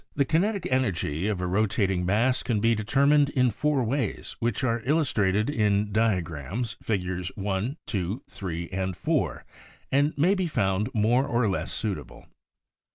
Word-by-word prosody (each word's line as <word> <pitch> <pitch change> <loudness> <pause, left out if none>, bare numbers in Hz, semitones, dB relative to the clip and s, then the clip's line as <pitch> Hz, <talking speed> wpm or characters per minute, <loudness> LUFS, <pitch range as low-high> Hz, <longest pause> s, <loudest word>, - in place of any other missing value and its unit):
The 140 - +2
kinetic 185 +5 +1
energy 95 - 0
of 100 -4 -1
a - - -1
rotating 95 -1 +1
mass 120 +7 +2
can 115 -5 0
be 115 +2 +3
determined 140 +6 +3
in 125 -3 +2
four 145 +3 0
ways 120 -1 -2
which 115 -1 -1
are 115 -2 +1
illustrated 115 -8 +1
in 105 -6 +1
diagrams, 95 - -1
Figs. 95 -3 -2
I, 100 +6 -2
2, 100 +5 -3
3 85 -3 -5
and 95 -1 -3
4 - - -1 0.5
and 145 +3 +2
may 170 +7 +4
be 190 -3 0
found 95 - 0
more 120 +6 +3
or 120 -3 +1
less 95 - -2
suitable. 105 -4 -4
110 Hz, 150 wpm, -26 LUFS, 95-130 Hz, 0.5 s, may